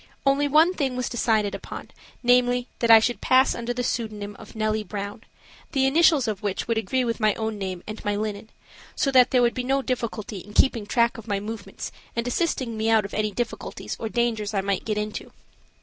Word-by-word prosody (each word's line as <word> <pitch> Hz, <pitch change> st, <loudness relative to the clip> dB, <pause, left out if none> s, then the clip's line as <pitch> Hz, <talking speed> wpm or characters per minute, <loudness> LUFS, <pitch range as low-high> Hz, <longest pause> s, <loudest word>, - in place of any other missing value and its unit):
Only 275 Hz, +1 st, +3 dB
one 315 Hz, +5 st, +5 dB
thing 270 Hz, -7 st, -1 dB
was 250 Hz, 0 st, -2 dB
decided 220 Hz, -4 st, +1 dB
upon, -, -, -8 dB, 0.3 s
namely, 245 Hz, 0 st, +3 dB
that 235 Hz, -, +1 dB
I 225 Hz, -, +11 dB
should 240 Hz, +2 st, -1 dB
pass 260 Hz, +1 st, +4 dB
under 235 Hz, 0 st, -4 dB
the 245 Hz, 0 st, -2 dB
pseudonym 210 Hz, -4 st, -3 dB
of 220 Hz, -, -13 dB
Nellie 215 Hz, 0 st, 0 dB
Brown, 205 Hz, +1 st, -6 dB, 0.5 s
the 270 Hz, -2 st, +3 dB
initials 295 Hz, -2 st, +4 dB
of 210 Hz, -3 st, -2 dB
which 200 Hz, -2 st, -2 dB
would 230 Hz, -1 st, +1 dB
agree 250 Hz, +5 st, 0 dB
with 230 Hz, 0 st, -2 dB
my 215 Hz, -2 st, +3 dB
own 220 Hz, -1 st, -3 dB
name 185 Hz, -2 st, -4 dB
and 215 Hz, 0 st, -7 dB
my 205 Hz, 0 st, 0 dB
linen, 210 Hz, +1 st, -4 dB, 0.5 s
so 275 Hz, -, +1 dB
that 255 Hz, -1 st, +6 dB
there 250 Hz, -1 st, +3 dB
would 240 Hz, -, +3 dB
be 250 Hz, -, -3 dB
no 270 Hz, +2 st, +1 dB
difficulty 230 Hz, -5 st, -3 dB
in 210 Hz, +3 st, -12 dB
keeping 230 Hz, -6 st, +3 dB
track 235 Hz, +1 st, +2 dB
of 225 Hz, -, -12 dB
my 200 Hz, -2 st, 0 dB
movements 205 Hz, -1 st, -7 dB, 0.2 s
and 235 Hz, +1 st, -1 dB
assisting 245 Hz, -5 st, -1 dB
me 220 Hz, +1 st, 0 dB
out 220 Hz, -2 st, +4 dB
of 200 Hz, -, -8 dB
any 215 Hz, 0 st, 0 dB
difficulties 235 Hz, +3 st, -4 dB
or 225 Hz, -, -3 dB
dangers 225 Hz, -3 st, -1 dB
I 195 Hz, -, +2 dB
might 195 Hz, -1 st, -2 dB
get 215 Hz, -1 st, -1 dB
into. 210 Hz, 0 st, -4 dB
225 Hz, 210 wpm, -25 LUFS, 210-250 Hz, 0.5 s, I